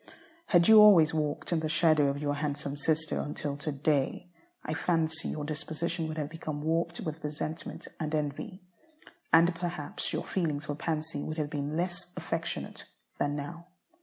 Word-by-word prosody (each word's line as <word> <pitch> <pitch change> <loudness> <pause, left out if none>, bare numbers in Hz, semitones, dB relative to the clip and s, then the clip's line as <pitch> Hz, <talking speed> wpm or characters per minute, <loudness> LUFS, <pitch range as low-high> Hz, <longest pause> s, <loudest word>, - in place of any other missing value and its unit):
Had 175 -3 +5
you 220 -1 +10
always 175 -7 +8
walked 150 0 -1
in 165 - +2
the 155 0 -2
shadow 155 -2 +4
of 140 0 0
your 145 -1 0
handsome 145 -1 -2
sister 155 +2 0
until 145 -1 -3
to 150 +1 -3
day, 145 +4 0 0.3
I 155 - -2
fancy 160 -1 0
your 150 - -3
disposition 160 +2 -2
would 155 0 -5
have 150 -2 -1
become 155 -2 -5
warped 165 +2 0
with 155 -2 -5
resentment 150 +2 -5
and 155 -1 -1
envy. 150 +5 -3 0.7
And 165 +2 +6
perhaps 170 -3 -3
your - - -2
feelings 155 -5 -1
for 145 - -2
Pansy 155 0 -2
would 155 +2 -4
have 150 -1 -2
been 145 +1 -2
less 180 +1 -2
affectionate 165 -1 -4 0.3
than 145 0 +1
now. 170 +4 -6
155 Hz, 165 wpm, -30 LUFS, 150-170 Hz, 0.7 s, you